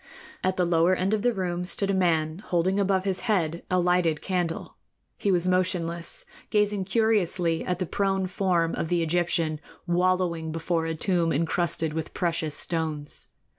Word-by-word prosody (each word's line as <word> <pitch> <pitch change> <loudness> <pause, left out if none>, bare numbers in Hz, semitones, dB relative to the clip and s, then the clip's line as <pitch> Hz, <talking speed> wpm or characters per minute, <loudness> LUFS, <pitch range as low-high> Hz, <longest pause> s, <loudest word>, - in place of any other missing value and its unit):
At 185 0 +1
the 180 - +1
lower 170 +2 +3
end 190 +3 0
of 215 - +1
the 245 +2 +3
room 180 -4 -2
stood 195 +2 +2
a - - 0
man 165 -3 +1
holding 185 0 0
above 195 -1 +2
his 190 -2 -1
head 170 -5 +1
a 185 - +2
lighted 175 -3 +2
candle. 180 -3 -3 0.4
He 200 - 0
was 180 -1 +1
motionless, 175 -2 0 0.2
gazing 210 -2 +1
curiously 185 -6 +1
at 180 - -1
the 185 - -2
prone 195 +1 0
form 180 -3 0
of - - -2
the 175 0 +1
Egyptian 165 -2 0 0.3
wallowing 175 -2 +1
before 165 0 -1
a 165 - -2
tomb 170 -1 +1
encrusted 165 0 0
with 160 0 -5
precious 165 -4 -1
stones. 155 -3 -1
175 Hz, 165 wpm, -26 LUFS, 165-185 Hz, 0.4 s, lower